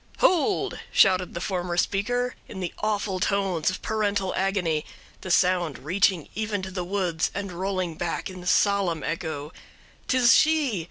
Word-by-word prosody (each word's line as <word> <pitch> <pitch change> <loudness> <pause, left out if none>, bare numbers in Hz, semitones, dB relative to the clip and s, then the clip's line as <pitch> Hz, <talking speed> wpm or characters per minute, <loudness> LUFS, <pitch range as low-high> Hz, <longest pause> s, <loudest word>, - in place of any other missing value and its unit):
"'Hold!' 370 +3 +2
shouted 185 -2 +3
the - - -2
former 180 -1 -2
speaker, 245 +7 0
in 190 - -8
the 180 -2 -4
awful 205 -3 -1
tones 190 -5 +1
of 185 - -5
parental 205 -3 0
agony, 180 -5 0 0.4
the 185 - -7
sound 180 -4 +2
reaching 180 +1 +1
even 210 -2 -2
to 190 - -5
the 180 -1 -3
woods, 175 -3 -1
and 200 -1 -4
rolling 185 -1 -2
back 170 +1 -3
in 185 -1 -9
solemn 190 -6 +2
echo. 155 -2 -4 0.5
''Tis 250 -2 +5
she! 310 - +3
190 Hz, 150 wpm, -25 LUFS, 175-205 Hz, 0.5 s, Tis